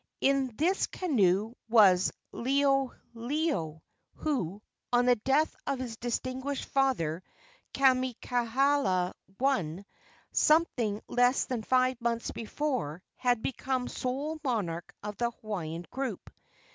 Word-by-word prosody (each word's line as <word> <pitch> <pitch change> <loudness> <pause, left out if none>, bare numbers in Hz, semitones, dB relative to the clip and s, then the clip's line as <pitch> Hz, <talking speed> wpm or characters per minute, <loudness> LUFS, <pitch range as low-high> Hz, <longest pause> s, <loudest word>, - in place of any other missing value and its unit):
In 270 -3 +2
this 360 +6 +2
canoe 215 - +1 0.2
was 195 -5 +6 0.2
Liholiho, 270 - 0 0.3
who, 210 - -2 0.3
on 245 0 +4
the 250 0 +5
death 270 +8 +2
of 275 - 0
his 250 -3 -5
distinguished 255 +4 -3
father, 215 - +1 0.5
Kamehameha 255 -5 +2 0.3
I., 195 - 0 0.5
something 245 -10 +2
less 245 +2 +3
than 250 -3 -3
five 255 +1 +2
months 235 0 -1
before, 230 - -3
had 245 -3 +1
become 260 -1 -1
sole 285 +5 -3
monarch 190 - -2
of 210 0 -5
the 240 0 +1
Hawaiian 175 -8 -5
group. 270 0 -4
245 Hz, 105 wpm, -30 LUFS, 210-270 Hz, 0.5 s, was